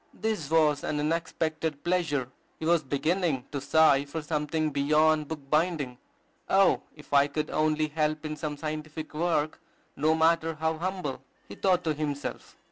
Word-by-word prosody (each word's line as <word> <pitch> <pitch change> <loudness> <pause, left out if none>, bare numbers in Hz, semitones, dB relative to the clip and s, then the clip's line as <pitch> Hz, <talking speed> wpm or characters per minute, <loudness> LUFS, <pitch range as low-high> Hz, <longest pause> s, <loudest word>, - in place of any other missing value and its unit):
This 215 -10 -2
was 155 -3 +3
an 150 - -1
unexpected 160 -1 -2
pleasure. 165 -8 0 0.3
He 160 - -4
was 170 0 +4
beginning 145 0 0
to 140 - -3
sigh 145 -1 +4
for 155 +2 -5
something 150 0 -1
beyond 150 +2 +3
book 160 -1 -5
binding. 150 -6 0 0.5
"Oh, 195 0 +4
if 150 -1 -13
I 140 0 +6
could 150 +1 -3
only 155 0 +1
help 155 0 -1
in 155 0 -3
some 150 -1 -4
scientific 155 0 -5
work, 155 -1 0 0.4
no 155 +3 +2
matter 160 0 +2
how 160 +1 -1
humble!" 180 -8 -3 0.3
he - - -9
thought 180 -2 +1
to 155 - +1
himself. 145 -1 -5
155 Hz, 155 wpm, -28 LUFS, 145-160 Hz, 0.5 s, I